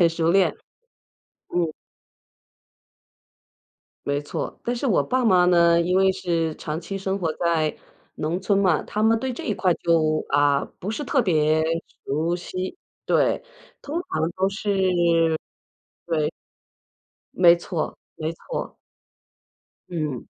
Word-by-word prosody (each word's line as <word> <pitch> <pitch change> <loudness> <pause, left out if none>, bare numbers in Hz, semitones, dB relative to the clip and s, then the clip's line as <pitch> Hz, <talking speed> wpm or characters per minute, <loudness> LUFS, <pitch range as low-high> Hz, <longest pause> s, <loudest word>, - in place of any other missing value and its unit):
很 170 - +7
熟 165 0 0
练。 190 0 +3 1.0
嗯。 170 -3 +1 2.3
没 145 0 0
错。 145 - -5
但 240 - -1
是 245 - -2
我 195 - +3
爸 255 - 0
妈 180 -4 +5
呢， 170 -1 +5
因 180 +2 +1
为 190 0 +4
是 165 -4 -1
长 155 +2 -4
期 195 +4 -5
生 195 0 -2
活 165 -4 -1
在 165 -3 0 0.4
农 165 +5 -2
村 195 +1 +1
嘛， 185 -6 +3
他 215 - -2
们 225 0 +4
对 260 0 -2
这 - - -7
一 215 - +1
块 185 -4 +2
就， 155 -2 +1
啊， 145 0 +3
不 190 - -6
是 295 - -3
特 270 - +2
别 155 -6 +2 0.5
熟 160 +5 0
悉， 185 - -5 0.3
对 - - +2 0.4
通 300 +4 -3
常 170 - 0
都 190 +1 +2
是 180 -5 +2 0.7
对。 155 -3 0 1.0
没 175 -1 +6
错 170 -2 -4 0.2
没 160 +1 -3
错。 - - -6 1.1
嗯。 155 -8 -3
175 Hz, 140 characters per minute, -24 LUFS, 160-195 Hz, 2.3 s, 很